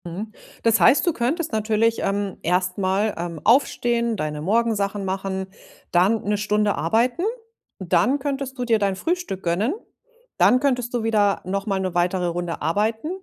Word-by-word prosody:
Mhm. 195 Hz, +6 st, -6 dB, 0.3 s
Das 230 Hz, 0 st, +3 dB
heißt, 285 Hz, -, +5 dB
du 345 Hz, -, +2 dB
könntest 295 Hz, +7 st, -1 dB
natürlich, 220 Hz, +1 st, +1 dB
ähm, 200 Hz, -1 st, -2 dB
erst 180 Hz, +1 st, 0 dB
mal, 195 Hz, +2 st, 0 dB
ähm, 170 Hz, -1 st, -5 dB
aufstehen, 235 Hz, -2 st, +2 dB
deine 150 Hz, -2 st, -3 dB
Morgensachen 205 Hz, 0 st, 0 dB
machen, 190 Hz, 0 st, -3 dB, 0.4 s
dann 195 Hz, +5 st, +3 dB
1 210 Hz, 0 st, 0 dB
Stunde 210 Hz, 0 st, +1 dB
arbeiten. 230 Hz, -, +1 dB, 0.6 s
Dann 190 Hz, +9 st, +2 dB
könntest 270 Hz, -1 st, -4 dB
du 250 Hz, -, -2 dB
dir 225 Hz, -2 st, +2 dB
dein 200 Hz, -2 st, 0 dB
Frühstück 335 Hz, -, -3 dB
gönnen. 190 Hz, -, 0 dB, 0.6 s
Dann 255 Hz, -, +5 dB
könntest 250 Hz, -3 st, 0 dB
du 240 Hz, -2 st, -1 dB
wieder 210 Hz, -3 st, +2 dB
noch 195 Hz, +3 st, -3 dB
mal 195 Hz, -2 st, 0 dB
'ne 185 Hz, -2 st, -2 dB
weitere 180 Hz, +1 st, +1 dB
Runde 175 Hz, 0 st, -3 dB
arbeiten. 215 Hz, -, 0 dB
210 Hz, 160 wpm, -23 LUFS, 185-235 Hz, 0.6 s, heißt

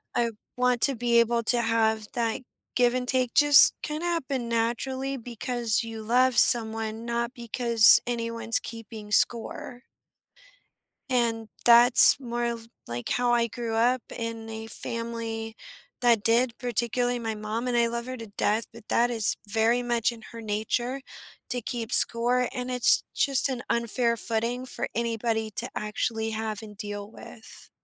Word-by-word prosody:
I 235 Hz, -1 st, 0 dB, 0.3 s
want 250 Hz, -1 st, +1 dB
to 275 Hz, -2 st, +4 dB
be 235 Hz, 0 st, +2 dB
able 235 Hz, 0 st, +1 dB
to 240 Hz, +1 st, +2 dB
have 220 Hz, -1 st, 0 dB
that 230 Hz, 0 st, -2 dB, 0.3 s
give 245 Hz, -1 st, +2 dB
and 250 Hz, 0 st, -3 dB
take 255 Hz, -2 st, -1 dB
just 290 Hz, -1 st, +8 dB
kinda 305 Hz, +3 st, -5 dB
happen 270 Hz, -8 st, -3 dB
naturally, 260 Hz, +4 st, -2 dB
because 240 Hz, -1 st, -2 dB
you 225 Hz, -1 st, -8 dB
love 250 Hz, +2 st, +2 dB
someone, 225 Hz, -1 st, +2 dB
not 235 Hz, +1 st, -3 dB
because 235 Hz, -2 st, +5 dB
anyone's 230 Hz, -1 st, -2 dB
keeping 220 Hz, -2 st, -10 dB
score. 245 Hz, +2 st, -1 dB, 1.3 s
And 230 Hz, -3 st, -1 dB, 0.2 s
that's 240 Hz, +2 st, +8 dB
more 240 Hz, -2 st, -4 dB
of, 230 Hz, -1 st, -5 dB, 0.2 s
like, 120 Hz, +1 st, -5 dB
how 245 Hz, 0 st, 0 dB
I 235 Hz, -1 st, +1 dB
grew 230 Hz, 0 st, -6 dB
up 245 Hz, +2 st, +1 dB, 0.2 s
in 230 Hz, -1 st, -6 dB
a 220 Hz, 0 st, -7 dB
family 230 Hz, -1 st, -5 dB, 0.5 s
that 235 Hz, -4 st, +2 dB
did, 235 Hz, +1 st, +1 dB
particularly 245 Hz, +1 st, -2 dB
my 225 Hz, -1 st, -4 dB
mom, 215 Hz, +3 st, -5 dB
and 245 Hz, -, -1 dB
I 235 Hz, 0 st, +3 dB
love 235 Hz, +1 st, -5 dB
her 255 Hz, 0 st, -6 dB
to 225 Hz, -1 st, -9 dB
death, 210 Hz, +2 st, -1 dB
but 230 Hz, -2 st, -15 dB
that 240 Hz, +1 st, +1 dB
is 220 Hz, -2 st, 0 dB
very 225 Hz, +3 st, +1 dB
much 240 Hz, -1 st, 0 dB
in 230 Hz, -2 st, -12 dB
her 230 Hz, 0 st, -9 dB
nature 240 Hz, +5 st, -3 dB, 0.5 s
to 245 Hz, -1 st, -3 dB
keep 235 Hz, 0 st, -6 dB
score, 245 Hz, +2 st, +2 dB
and 250 Hz, -1 st, -5 dB
it's 250 Hz, -1 st, +5 dB
just 275 Hz, 0 st, +2 dB
an 250 Hz, -3 st, -4 dB
unfair 235 Hz, 0 st, 0 dB
footing 235 Hz, +3 st, -1 dB
for -, -, -4 dB
anybody 225 Hz, -1 st, -2 dB
to -, -, -2 dB
actually 220 Hz, +1 st, -3 dB
have 220 Hz, -1 st, -4 dB
and 210 Hz, -1 st, -12 dB
deal 205 Hz, -1 st, -7 dB
with. 220 Hz, -, -14 dB
235 Hz, 155 wpm, -25 LUFS, 225-245 Hz, 1.3 s, just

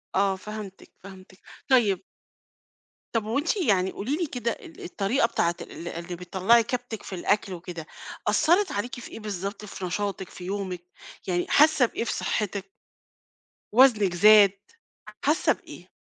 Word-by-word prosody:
آه 195 Hz, 0 st, +3 dB
فهمتِك، 210 Hz, -1 st, -9 dB
فهمتِك، 190 Hz, -1 st, -13 dB, 0.3 s
طيب 210 Hz, -8 st, +3 dB, 1.1 s
طب 225 Hz, -2 st, 0 dB
هو 225 Hz, +5 st, -1 dB
أنتِ 330 Hz, +8 st, 0 dB
يعني 195 Hz, -, +2 dB
قولي 260 Hz, +9 st, -2 dB
لي 350 Hz, -, 0 dB
كده 240 Hz, -3 st, -2 dB
ال 165 Hz, -, -10 dB
الطريقة 205 Hz, +8 st, +1 dB
بتاعة 170 Hz, -6 st, 0 dB
ال 170 Hz, -, -8 dB
اللي 170 Hz, +1 st, -5 dB
بتطلّعي 190 Hz, +6 st, +3 dB
كبتِك 240 Hz, -2 st, -4 dB
في 190 Hz, -, -6 dB
الأكل 195 Hz, +1 st, 0 dB
وكده، 170 Hz, -2 st, -7 dB, 0.4 s
أثرت 365 Hz, +5 st, +3 dB
عليكِ 245 Hz, +5 st, -3 dB
في -, -, -10 dB
إيه -, -, -8 dB
بالضبط 200 Hz, 0 st, -5 dB
في 190 Hz, -2 st, -6 dB
نشاطِك 195 Hz, +1 st, -3 dB
في 180 Hz, -, -11 dB
يومِك، 190 Hz, -2 st, -4 dB, 0.5 s
يعني 175 Hz, -1 st, 0 dB
حاسة 305 Hz, -3 st, +5 dB
بإيه 230 Hz, -, -3 dB
في 235 Hz, -, -2 dB
صحتِك؟ 200 Hz, -2 st, -2 dB, 1.1 s
وزنِك 220 Hz, -7 st, +5 dB
زاد، 205 Hz, +2 st, +7 dB, 0.7 s
حاسة -, -, +3 dB
بإيه؟ -, -, -13 dB
200 Hz, 145 wpm, -26 LUFS, 185-235 Hz, 1.1 s, زاد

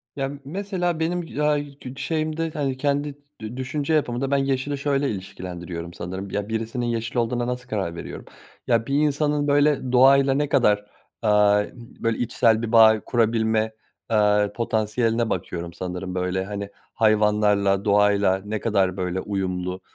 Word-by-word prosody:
Ya 135 Hz, -2 st, -1 dB
m 140 Hz, 0 st, -8 dB
mesela 180 Hz, 0 st, -2 dB
benim, 165 Hz, -2 st, -2 dB
aaa, 150 Hz, 0 st, +3 dB
yı 145 Hz, -1 st, -7 dB
ç 130 Hz, +1 st, -9 dB
şeyimde 160 Hz, 0 st, -2 dB
hani 135 Hz, -3 st, -2 dB
kendi 145 Hz, +1 st, -1 dB, 0.3 s
dü 110 Hz, +3 st, -6 dB
düşünce 140 Hz, +4 st, -2 dB
yapımda 135 Hz, -3 st, 0 dB
ben 140 Hz, -, +3 dB
yeşili 135 Hz, +1 st, -1 dB
şöyle 140 Hz, 0 st, 0 dB
ilişkilendiriyorum 90 Hz, -3 st, -6 dB
sanırım, 95 Hz, +3 st, -6 dB
ya, 105 Hz, +1 st, -3 dB
birisinin 115 Hz, +2 st, -2 dB
yeşil 115 Hz, 0 st, -3 dB
olduğuna 120 Hz, +1 st, 0 dB
nasıl 125 Hz, 0 st, -4 dB
karar 95 Hz, -7 st, -2 dB
veriyorum? 85 Hz, -, -8 dB, 0.4 s
Ya, 115 Hz, -1 st, +2 dB
bir 140 Hz, -, -2 dB
insanın 145 Hz, 0 st, +1 dB
böyle 145 Hz, -2 st, +2 dB
doğayla 135 Hz, +2 st, +6 dB
ne 145 Hz, +1 st, 0 dB
kadar, 105 Hz, -6 st, +3 dB, 0.4 s
eee, 105 Hz, -1 st, +3 dB
böyle 115 Hz, -2 st, -4 dB
içsel 115 Hz, -2 st, +2 dB
bir 115 Hz, -1 st, -3 dB
bağ 110 Hz, -2 st, +7 dB
kurabilme, 110 Hz, -2 st, +1 dB, 0.4 s
eee, 105 Hz, -1 st, +3 dB
potansiyeline 115 Hz, 0 st, 0 dB
bakıyorum 85 Hz, -1 st, -4 dB
sanırım 90 Hz, 0 st, -5 dB
böyle 90 Hz, +1 st, -1 dB
hani 100 Hz, 0 st, -5 dB, 0.2 s
hayvanlarla, 105 Hz, -2 st, +2 dB
doğayla 100 Hz, -2 st, +3 dB
ne 105 Hz, +1 st, -3 dB
kadar 95 Hz, -4 st, +1 dB
böyle 90 Hz, 0 st, -2 dB
uyumlu, 95 Hz, -2 st, -3 dB
115 Hz, 150 wpm, -23 LUFS, 100-140 Hz, 0.4 s, bağ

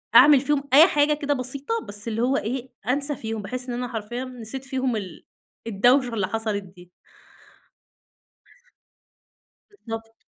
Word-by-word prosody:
أعمل 290 Hz, -2 st, +9 dB
فيهم 285 Hz, -1 st, 0 dB
أي 315 Hz, +6 st, +9 dB
حاجة 295 Hz, -1 st, +3 dB
كده 290 Hz, -1 st, -1 dB
بسيطة، 280 Hz, -, -2 dB
بس 205 Hz, +2 st, -6 dB
اللي 225 Hz, 0 st, -1 dB
هو 265 Hz, +3 st, +2 dB
إيه، 255 Hz, +3 st, -3 dB, 0.2 s
أنسى 280 Hz, +2 st, 0 dB
فيهم 220 Hz, -2 st, -5 dB
بحيث 250 Hz, +4 st, -5 dB
إن -, -, -2 dB
أنا 250 Hz, 0 st, -3 dB
حرفيًا 240 Hz, +2 st, -5 dB
نسيت 255 Hz, +1 st, -8 dB
فيهم 260 Hz, -3 st, -1 dB
ال 190 Hz, -5 st, -7 dB, 0.4 s
الدوشة 245 Hz, +4 st, +3 dB
اللي 195 Hz, -4 st, 0 dB
حصَلِت 215 Hz, -1 st, -2 dB
دي. 180 Hz, -1 st, -16 dB, 2.8 s
بالضبط. 225 Hz, -, -8 dB
250 Hz, 140 wpm, -24 LUFS, 220-275 Hz, 2.8 s, أعمل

